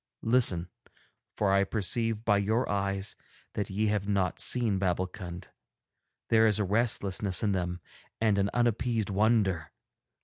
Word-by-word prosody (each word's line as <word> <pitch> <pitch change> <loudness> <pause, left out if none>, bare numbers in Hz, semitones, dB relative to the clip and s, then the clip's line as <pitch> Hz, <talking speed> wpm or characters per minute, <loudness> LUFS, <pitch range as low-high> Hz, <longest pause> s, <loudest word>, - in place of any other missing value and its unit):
Listen, 110 -8 +3 0.7
for 100 -2 +1
I 100 0 +4
perceive 110 +2 -1
by 105 -2 +3
your 110 +5 0
eyes 100 -1 -2 0.4
that 105 - -3
ye 105 +3 -1
have 105 -2 -1
not 100 -3 0
seen 115 -6 +1
Babbulkund; 90 -1 -3 0.8
there 110 0 +5
is 105 - +2
a 105 - +1
restlessness 100 -2 +1
in 105 - +2
them 90 -2 -2 0.4
and 110 -3 +2
an 100 0 +1
unappeased 115 -2 0
wonder. 100 -5 +1
100 Hz, 135 wpm, -29 LUFS, 95-110 Hz, 0.8 s, there